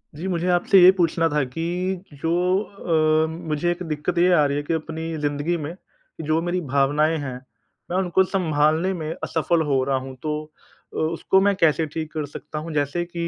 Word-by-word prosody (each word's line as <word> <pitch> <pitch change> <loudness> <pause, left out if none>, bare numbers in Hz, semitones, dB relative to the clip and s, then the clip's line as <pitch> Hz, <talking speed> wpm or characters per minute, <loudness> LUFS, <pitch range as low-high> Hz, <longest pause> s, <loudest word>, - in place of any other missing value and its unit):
जी, 175 +5 -5
मुझे 175 -1 -1
आपसे 180 +2 +4
ये 180 +1 +9
पूछना 165 -1 +2
था 150 -2 +1
कि 175 +6 -3 0.2
जो 165 - 0 0.3
अ, 160 -5 +1 0.2
मुझे 155 +3 0
एक 175 +1 -4
दिक्कत 155 +3 -2
ये 180 +1 +4
आ 150 -4 +5
रही 140 0 0
है 145 - -2
कि 155 - -2
अपनी 160 0 -4
ज़िंदगी 145 +3 -1
में 155 +2 -6 0.5
जो 160 +1 +2
मेरी 175 +1 -1
भावनाएँ 145 +3 +2
हैं, 140 -4 -4 0.6
मैं 180 - 0
उनको 190 0 +2
संभालने 165 -1 +1
में 160 -3 -4
असफल 165 +1 +1
हो 135 -3 +1
रहा 135 0 0
हूँ। 130 0 -7
तो 155 -1 -1 0.6
अ, - - -6
उसको 165 +4 +1
मैं 200 0 +3
कैसे 165 -3 +2
ठीक 155 +1 -5
कर 155 -2 -2
सकता 150 +2 -7
हूँ 165 +2 -6
जैसे 145 +3 0
कि 170 -1 -4
160 Hz, 195 wpm, -23 LUFS, 150-175 Hz, 0.6 s, ये